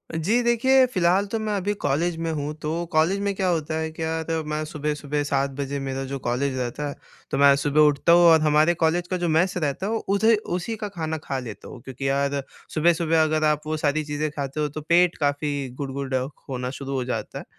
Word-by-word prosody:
जी, 205 Hz, +10 st, +1 dB
देखिए 260 Hz, +3 st, +4 dB
फ़िलहाल 185 Hz, +2 st, +3 dB
तो 225 Hz, -, -1 dB
मैं 215 Hz, -1 st, -2 dB
अभी 200 Hz, +1 st, -1 dB
कॉलेज 165 Hz, +5 st, +1 dB
में 165 Hz, 0 st, -2 dB
हूँ 150 Hz, 0 st, -3 dB
तो 150 Hz, -, -3 dB, 0.2 s
कॉलेज 165 Hz, +6 st, +3 dB
में 200 Hz, 0 st, 0 dB
क्या 190 Hz, -1 st, 0 dB
होता 160 Hz, -3 st, -1 dB
है, 160 Hz, 0 st, -2 dB
क्या 160 Hz, 0 st, -3 dB
होता 160 Hz, 0 st, -2 dB
मैं 155 Hz, 0 st, -1 dB
सुबह-सुबह 150 Hz, -1 st, -3 dB
7 140 Hz, -1 st, 0 dB
बजे 140 Hz, 0 st, -2 dB
मेरा 135 Hz, 0 st, -3 dB
जो 140 Hz, -, -3 dB
कॉलेज 130 Hz, +2 st, -1 dB
रहता 125 Hz, +4 st, -3 dB
है। 140 Hz, -, -7 dB, 0.4 s
तो 135 Hz, -, 0 dB
मैं 140 Hz, 0 st, +6 dB
सुबह 145 Hz, +2 st, +2 dB
उठता 145 Hz, +3 st, +2 dB
हूँ 175 Hz, -, +7 dB
और 160 Hz, -, +7 dB
हमारे 155 Hz, +2 st, +4 dB
कॉलेज 170 Hz, +2 st, 0 dB
का 185 Hz, -, -1 dB
जो 175 Hz, -, +2 dB
मेस 170 Hz, +4 st, +2 dB
रहता 150 Hz, +2 st, -2 dB
है 210 Hz, -, -1 dB
वो 225 Hz, -, +1 dB, 0.2 s
उधे 220 Hz, +2 st, +4 dB, 0.2 s
उसी 225 Hz, +6 st, -4 dB
का 210 Hz, -1 st, -5 dB
खाना 160 Hz, -4 st, -3 dB
खा 135 Hz, -, -3 dB
लेता 115 Hz, -5 st, -9 dB
हूँ। 125 Hz, -4 st, -10 dB
क्योंकि 135 Hz, +1 st, -5 dB
यार 140 Hz, 0 st, 0 dB, 0.3 s
सुबह-सुबह 165 Hz, 0 st, +3 dB
अगर 155 Hz, 0 st, 0 dB
आप 150 Hz, 0 st, +2 dB
वो 155 Hz, 0 st, -1 dB
सारी 155 Hz, +1 st, 0 dB
चीज़ें 150 Hz, +1 st, -2 dB
खाते 140 Hz, 0 st, -4 dB
हो 150 Hz, -, +1 dB
तो 150 Hz, +2 st, -6 dB
पेट 170 Hz, +3 st, +3 dB
काफ़ी 145 Hz, -1 st, -1 dB
गुड़गुड़ा 135 Hz, -1 st, -2 dB, 0.3 s
होना 125 Hz, -1 st, -3 dB
शुरू 140 Hz, 0 st, -5 dB
हो 130 Hz, -, -1 dB
जाता 115 Hz, -4 st, -4 dB
है। -, -, -10 dB
155 Hz, 225 wpm, -24 LUFS, 140-170 Hz, 0.4 s, हूँ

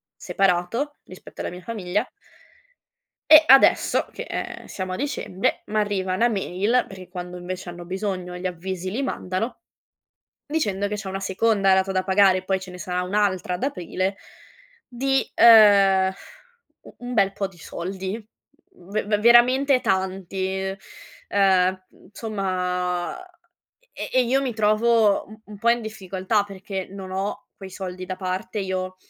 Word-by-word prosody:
separato 195 Hz, +10 st, 0 dB
rispetto 185 Hz, -, -11 dB
alla -, -, -4 dB
mia 180 Hz, +1 st, -9 dB
famiglia". 200 Hz, -2 st, -2 dB, 1.2 s
E 310 Hz, 0 st, +10 dB
adesso 270 Hz, +1 st, +5 dB
che, -, -, -6 dB
ehm, -, -, -6 dB
siamo 185 Hz, -1 st, -5 dB
a -, -, -2 dB
dicembre, 255 Hz, -9 st, -2 dB
m'arriva 205 Hz, -3 st, -1 dB
una 235 Hz, +6 st, +3 dB
mail, 205 Hz, +3 st, 0 dB
perché 185 Hz, -2 st, -11 dB
quando, 180 Hz, 0 st, -7 dB
invece, 180 Hz, +1 st, -6 dB
hanno 175 Hz, 0 st, -8 dB
bisogno 185 Hz, -1 st, -4 dB
gli 180 Hz, +1 st, -5 dB
avvisi 185 Hz, +1 st, -4 dB
li 240 Hz, +8 st, -2 dB
mandano, 225 Hz, -, -3 dB, 0.8 s
dicendo 205 Hz, -10 st, -1 dB
che 210 Hz, -, -3 dB
c'è 205 Hz, -2 st, -5 dB
una 195 Hz, 0 st, -4 dB
seconda 195 Hz, 0 st, +2 dB
rata 190 Hz, 0 st, +1 dB
da 185 Hz, 0 st, +1 dB
pagare 190 Hz, -1 st, +4 dB
e 185 Hz, -, -9 dB
poi 190 Hz, 0 st, 0 dB
ce 185 Hz, -1 st, -10 dB
ne 180 Hz, -, -10 dB
sarà 180 Hz, +1 st, -2 dB
un'altra 185 Hz, -1 st, 0 dB
ad 180 Hz, -, -3 dB
aprile, 190 Hz, -, -2 dB, 0.7 s
di, 270 Hz, +2 st, 0 dB
uhm, 200 Hz, -4 st, +7 dB, 0.7 s
u -, -, -15 dB
un 245 Hz, 0 st, -6 dB
bel 195 Hz, -3 st, +3 dB
po' 200 Hz, -, -2 dB
di 180 Hz, -, -19 dB
soldi. 190 Hz, +6 st, -6 dB, 0.5 s
V 200 Hz, +4 st, -3 dB
ve 210 Hz, -1 st, +1 dB
veramente 250 Hz, +4 st, +5 dB
tanti, 190 Hz, 0 st, -2 dB, 0.5 s
ehm, 185 Hz, -1 st, +2 dB
insomma 185 Hz, -, -3 dB, 0.7 s
e -, -, -4 dB
e 255 Hz, -, +4 dB
io 260 Hz, +3 st, +1 dB
mi 250 Hz, -4 st, -2 dB
trovo 215 Hz, 0 st, +3 dB
un 215 Hz, +1 st, -14 dB
un 210 Hz, -1 st, -12 dB
po' 235 Hz, +3 st, 0 dB
in 240 Hz, -, +2 dB
difficoltà 200 Hz, -1 st, -1 dB
perché 195 Hz, -1 st, -6 dB
non 195 Hz, -1 st, -8 dB
ho 195 Hz, +2 st, -4 dB
quei 190 Hz, -1 st, -10 dB
soldi 185 Hz, -1 st, -6 dB
da 185 Hz, 0 st, -4 dB
parte 185 Hz, +2 st, -4 dB
io, 185 Hz, -1 st, -3 dB
195 Hz, 150 wpm, -23 LUFS, 185-215 Hz, 1.2 s, E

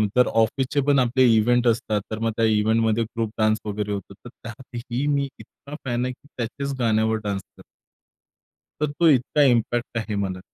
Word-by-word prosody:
तर 125 Hz, 0 st, +5 dB
ऑफिसचेपण 135 Hz, +5 st, +1 dB
आपले 130 Hz, +1 st, +3 dB
इव्हेंट 120 Hz, +3 st, +3 dB
असतात. 110 Hz, -2 st, +1 dB
तर 110 Hz, -, -3 dB
मग 115 Hz, 0 st, 0 dB
त्या 115 Hz, -, +3 dB
इव्हेंटमध्ये 110 Hz, +1 st, +2 dB
ग्रुप 115 Hz, 0 st, -3 dB
डान्स 110 Hz, 0 st, +2 dB
वगैरे 105 Hz, 0 st, -3 dB
होतो. 100 Hz, -2 st, -5 dB
तर -, -, -13 dB
त्यातही 120 Hz, +2 st, -6 dB
मी 140 Hz, -1 st, +1 dB
इतका 145 Hz, +1 st, -12 dB
फॅन 120 Hz, -1 st, -1 dB
आहे 130 Hz, -, -2 dB
की 140 Hz, +3 st, -23 dB
त्याच्याच 140 Hz, +4 st, -3 dB
गाण्यावर 110 Hz, -1 st, +2 dB
डान्स 100 Hz, -1 st, -2 dB, 0.2 s
करतो. -, -, -15 dB, 1.2 s
तर 150 Hz, -1 st, 0 dB
तो 165 Hz, +3 st, +2 dB
इतका 140 Hz, +1 st, +2 dB
इम्पॅक्ट 120 Hz, -2 st, +1 dB
आहे 110 Hz, -2 st, -3 dB
मला. 95 Hz, -2 st, -2 dB
115 Hz, 170 wpm, -23 LUFS, 110-130 Hz, 1.2 s, तर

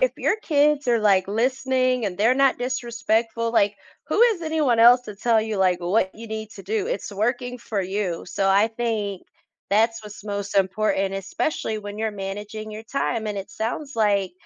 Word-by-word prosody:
if -, -, +3 dB
your -, -, +1 dB
kids 290 Hz, -2 st, +2 dB
are 235 Hz, -1 st, +4 dB
like 195 Hz, -3 st, +3 dB
listening 255 Hz, +2 st, +1 dB
and 185 Hz, -3 st, -4 dB
they're 225 Hz, +6 st, +3 dB
not 275 Hz, 0 st, +3 dB
disrespectful, 230 Hz, -2 st, -1 dB
like, 205 Hz, -2 st, +3 dB, 0.3 s
who -, -, +1 dB
is 455 Hz, -7 st, +4 dB
anyone 310 Hz, -7 st, +1 dB
else 240 Hz, +2 st, +7 dB
to 210 Hz, -4 st, -9 dB
tell 225 Hz, +2 st, +2 dB
you, 215 Hz, -1 st, -3 dB
like, 185 Hz, -2 st, +2 dB
what 190 Hz, +2 st, +1 dB
you 230 Hz, +1 st, -10 dB
need 220 Hz, -1 st, -6 dB
to 195 Hz, -, -9 dB
do? 210 Hz, +2 st, -2 dB
It's 205 Hz, -, -4 dB
working 245 Hz, +4 st, -1 dB
for 220 Hz, -3 st, -3 dB
you. 190 Hz, -2 st, -3 dB
So 195 Hz, +2 st, 0 dB
I 200 Hz, +3 st, +4 dB
think 220 Hz, -4 st, -3 dB, 0.5 s
that's 225 Hz, +2 st, +2 dB
what's 210 Hz, 0 st, -11 dB
most 200 Hz, -1 st, -4 dB
important, 195 Hz, 0 st, +1 dB
especially 215 Hz, +3 st, -2 dB
when 205 Hz, 0 st, -7 dB
you're 220 Hz, 0 st, -1 dB
managing 205 Hz, +2 st, -6 dB
your 215 Hz, +1 st, -7 dB
time. 230 Hz, -2 st, -2 dB
And 205 Hz, -1 st, -3 dB
it 195 Hz, -, -7 dB
sounds 270 Hz, +6 st, -4 dB
like 205 Hz, -3 st, +1 dB
220 Hz, 185 wpm, -23 LUFS, 200-240 Hz, 0.5 s, else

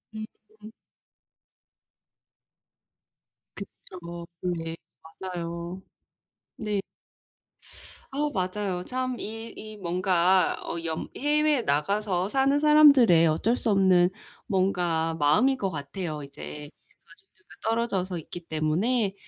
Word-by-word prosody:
음음. 215 Hz, 0 st, -11 dB, 2.8 s
그쵸. 175 Hz, -3 st, -9 dB, 0.2 s
네 165 Hz, -2 st, -3 dB, 0.6 s
맞아요. 170 Hz, +2 st, -5 dB, 0.8 s
네. 210 Hz, -2 st, -1 dB, 1.3 s
아우 295 Hz, +2 st, -1 dB
맞아요. 185 Hz, -1 st, -2 dB
참 255 Hz, 0 st, -2 dB
이 225 Hz, +2 st, -6 dB
이 215 Hz, 0 st, -9 dB
뭔가 180 Hz, 0 st, +2 dB
어 170 Hz, -, -4 dB
연 160 Hz, -1 st, -3 dB
해외에 295 Hz, -2 st, +2 dB
나가서 185 Hz, +5 st, 0 dB
사는 270 Hz, +3 st, +2 dB
사람들의 280 Hz, -, +7 dB
어쩔 220 Hz, +10 st, +1 dB
수 230 Hz, -, -1 dB
없는 185 Hz, -3 st, +4 dB, 0.4 s
뭔가 175 Hz, -4 st, +1 dB
마음일 160 Hz, -, +4 dB
것 195 Hz, -4 st, -1 dB
같아요 155 Hz, 0 st, -5 dB
이제 145 Hz, +1 st, -9 dB, 0.4 s
가족들과 400 Hz, 0 st, -24 dB, 0.2 s
떨어져서 195 Hz, -6 st, -1 dB
있기 175 Hz, +2 st, -9 dB
때문에 190 Hz, +8 st, 0 dB
190 Hz, 195 characters per minute, -27 LUFS, 170-225 Hz, 2.8 s, 사람들의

